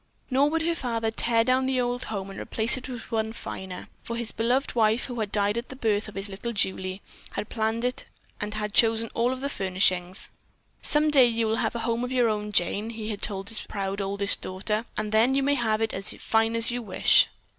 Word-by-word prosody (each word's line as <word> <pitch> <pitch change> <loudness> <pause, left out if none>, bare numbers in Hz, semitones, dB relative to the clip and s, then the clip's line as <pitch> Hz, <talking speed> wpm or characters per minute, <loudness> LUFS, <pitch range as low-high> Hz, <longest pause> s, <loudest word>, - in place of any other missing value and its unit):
Nor 275 +3 +4
would 325 +1 0
her 335 +1 +1
father 230 -7 -2
tear 230 0 +3
down 255 +2 +2
the 260 -1 +1
old 245 0 -1
home 195 -3 -4
to 195 - -7
replace 225 +1 +1
it 260 0 -7
with 245 -3 -8
one 220 -1 -1
finer, 190 -4 -7
for 235 - -5
his 235 -1 -3
beloved 245 +5 0
wife, 225 0 +3
who 245 -2 -5
had 210 -2 -2
died 205 +2 +1
at 235 - -9
the 265 - -8
birth 220 -5 0
of 210 - -10
little 200 +4 -4
Julie, 190 -1 -1 0.3
had 210 - -4
planned 225 +1 -1
it 250 0 -2 0.3
and 210 0 -3
had 210 -1 -3
chosen 225 0 +3
all 235 +2 +1
of 260 0 -4
the 280 - -1
furnishings. 185 -4 +1 0.5
"Some 300 +1 +2
day 265 -4 +7
you 230 -1 0
will 220 +1 0
have - - -1
a - - -1
home 235 +1 0
of 250 - -3
your 245 -3 +3
own, 210 -1 -2
Jane," 205 +4 +1
he 220 -1 -5
had 205 -1 -4
told 195 -1 -1
his 225 - -1
proud 195 0 -3
older 200 +1 -2
daughter, 205 +3 0
"and 215 -1 -2
then 230 +5 +4
you 275 - +2
may 285 +1 +3
have 225 -5 +1
it 225 0 +1
as 195 +1 -1
fine 225 0 +1
as 230 +1 +2
you 245 0 -2
wish." 200 -5 +4
225 Hz, 230 wpm, -26 LUFS, 205-245 Hz, 0.5 s, day